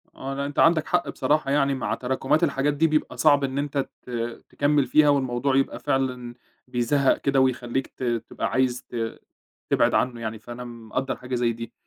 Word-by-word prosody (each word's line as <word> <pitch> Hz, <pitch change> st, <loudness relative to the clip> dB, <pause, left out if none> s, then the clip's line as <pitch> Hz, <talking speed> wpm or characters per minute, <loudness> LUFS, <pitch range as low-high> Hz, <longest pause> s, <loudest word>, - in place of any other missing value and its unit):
آه، 135 Hz, +1 st, -5 dB
لأ، 140 Hz, +1 st, -2 dB
أنت 145 Hz, -, -4 dB
عندك 165 Hz, -1 st, +4 dB
حق -, -, +1 dB
بصراحة 150 Hz, -2 st, 0 dB
يعني 140 Hz, -1 st, +2 dB
مع 130 Hz, -, -2 dB
تراكمات 130 Hz, +5 st, 0 dB
الحاجات 145 Hz, -1 st, +1 dB
دي 160 Hz, +3 st, +3 dB
بيبقى 155 Hz, 0 st, -1 dB
صعب 145 Hz, -2 st, +4 dB
إن 135 Hz, 0 st, -2 dB
أنت 140 Hz, -1 st, -1 dB, 0.2 s
ت -, -, -13 dB, 0.4 s
تكمّل 145 Hz, -1 st, +2 dB
فيها، 150 Hz, +3 st, +5 dB
والموضوع 130 Hz, -1 st, +1 dB
يبقى 135 Hz, -, +1 dB
فعلًا 125 Hz, -2 st, -1 dB, 0.3 s
بيزهّق 125 Hz, +3 st, +2 dB
كده، 135 Hz, -1 st, +1 dB
ويخليك 130 Hz, 0 st, 0 dB
ت -, -, -10 dB
تبقى 120 Hz, -2 st, -2 dB
عايز 125 Hz, -1 st, +1 dB
ت 115 Hz, -2 st, -4 dB, 0.5 s
تبعد -, -, +3 dB
عنه 120 Hz, -2 st, 0 dB
يعني، 110 Hz, -1 st, -4 dB
فأنا 120 Hz, +2 st, -8 dB
مقدّر 120 Hz, +2 st, -4 dB
حاجة 125 Hz, 0 st, -5 dB
زي 120 Hz, -1 st, +1 dB
دي، 115 Hz, 0 st, -8 dB
130 Hz, 180 wpm, -25 LUFS, 120-140 Hz, 0.5 s, فيها